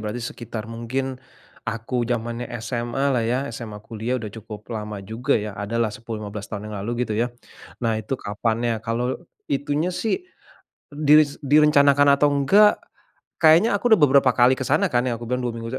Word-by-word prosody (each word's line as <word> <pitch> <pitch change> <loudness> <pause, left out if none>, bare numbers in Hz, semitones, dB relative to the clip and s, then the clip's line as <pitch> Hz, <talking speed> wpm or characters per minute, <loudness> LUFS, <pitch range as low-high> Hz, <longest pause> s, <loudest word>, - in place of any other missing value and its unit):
berarti 105 +2 -4
sekitar 115 -2 -6
mungkin 130 +3 -4 0.5
aku 120 +1 -2
zamannya 120 0 -3
SMA-lah 120 +2 -1
ya, 125 +3 +1 0.2
SMA, 110 -3 -7
kuliah 115 +3 -3
sudah 110 -3 -6
cukup 110 0 -10
lama 105 -1 -5
juga 115 +7 -1
ya, 105 0 -4
adalah 110 +3 -1
10, 115 -3 -7
15 105 0 -7
tahun 105 0 -6
yang - - -6
lalu 120 +3 -2
gitu 110 - -3
ya. 120 - +2 0.6
Nah 115 -2 +1
itu 110 +5 -3
kapannya, 115 +2 -1
kalau 120 +2 -2 0.3
itunya 145 +4 0
sih 230 - -1 0.7
dis 150 0 +4
direncanakan 145 -1 +5
atau 145 - +4
enggak, 195 +10 +4 0.6
kayaknya 165 +7 +6
aku 235 +4 0
sudah 220 - +7
beberapa 135 -2 +5
kali 125 +2 +5
ke 130 - -4
sana - - +3
kan 120 0 +2
ya, 120 - 0
aku 120 - -7
bilang 125 0 -1
dua 120 - -1
minggu 115 0 -6
120 Hz, 170 wpm, -23 LUFS, 110-140 Hz, 0.7 s, sudah